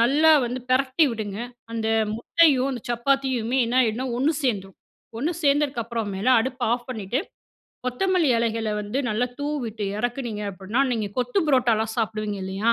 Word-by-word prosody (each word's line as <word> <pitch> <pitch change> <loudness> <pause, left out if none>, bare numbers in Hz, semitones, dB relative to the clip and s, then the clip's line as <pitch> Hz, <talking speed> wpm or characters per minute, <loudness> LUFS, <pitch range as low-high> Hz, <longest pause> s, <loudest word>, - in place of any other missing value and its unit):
நல்லா 290 +7 +5 0.2
வந்து 250 +2 -4
பெரட்டி 260 +4 +3
விடுங்க. 210 -3 -4 0.3
அந்த 225 -1 -2 0.3
முட்டையும், 275 +1 +3
அந்த 245 -4 -6
சப்பாத்தியுமே 255 0 0
என்ன 240 +2 -1
ஆயிடும்னா, 240 +2 0
ஒண்ணு 290 +5 +2
சேந்துடும். 195 -7 -1 0.4
ஒண்ணு 310 +7 0
சேர்ந்தற்கப்புற 270 -5 +1
மேல, 195 +6 -1
அடுப்பை 255 +1 -2
ஆஃப் 240 0 -8
பண்ணிட்டு, 225 +2 -2 0.7
கொத்தமல்லி 335 +3 +2
இலைகள 225 -1 -1
வந்து, 210 +6 -3
நல்லா 235 +4 0
தூவிட்டு 240 -8 -3
இறக்கினீங்க 240 -3 -3
அப்படின்னா, 200 +7 -1
நீங்க 220 -3 -1
கொத்து 245 +9 0
புரோட்டாலாம் 230 -5 +2
சாப்பிடுவீங்க 215 -2 -2
இல்லையா, 195 +5 +1
240 Hz, 140 wpm, -24 LUFS, 220-265 Hz, 0.7 s, நல்லா